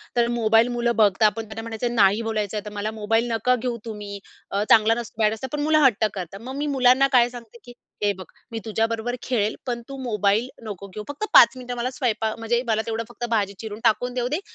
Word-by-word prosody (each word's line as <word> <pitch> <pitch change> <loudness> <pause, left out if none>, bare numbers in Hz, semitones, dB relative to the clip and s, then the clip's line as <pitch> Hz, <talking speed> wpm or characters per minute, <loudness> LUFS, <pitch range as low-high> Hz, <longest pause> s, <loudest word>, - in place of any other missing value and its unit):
तर 240 -1 +3
मोबाईल 225 +1 +4
मुलं 235 0 +1
बघता 210 -1 +4
आपण 215 +2 +1
त्यांना 220 +1 -7
म्हणायचं 230 +1 -3
नाही 205 +1 +4
बोलायचं 215 -2 -2
आहे 210 - -5
तर 210 - -7
मला 210 +1 -3
मोबाईल 225 +3 +1
नका 240 +3 +2
घेऊ 245 -1 -3
तुम्ही 205 -2 -7 0.3
अ, 200 +1 0
चांगला 220 0 +6
नसतं 230 -1 -5
बॅड 215 +1 +3
असतं 240 +4 -5
पण 295 - -3
मुलं 310 +1 +3
हट्ट 220 -4 +3
करतात. 190 0 -6
मग 260 +3 -7
मी 295 - -2
मुलांना 255 +2 +5
काय 240 0 +5
सांगते 235 -1 -12
की 245 - -12 0.3
"हे 205 - +3
बघ, 185 -1 -9 0.3
मी 225 - -4
तुझ्याबरोबर 225 +2 -1
खेळेल 220 -4 0
पण 240 -2 -3
तू 275 - -7
मोबाईल 210 0 +1 0.2
नको 200 -3 -7
घेऊ 210 +3 -8
फक्त 290 +9 -3
5 - - +8
मिनिटं 250 -1 -6
मला 240 +1 -1
स्वयंपाक 225 -4 -1
म्हणजे 235 +2 0
मला 220 -1 +1
तेवढं 225 0 -2
फक्त 240 0 -5
भाजी 205 -3 0
चिरून 215 -1 -7
टाकून 245 +4 +2
देऊ 245 -1 -1
दे, 300 +6 -1
225 Hz, 225 wpm, -23 LUFS, 210-245 Hz, 0.3 s, 5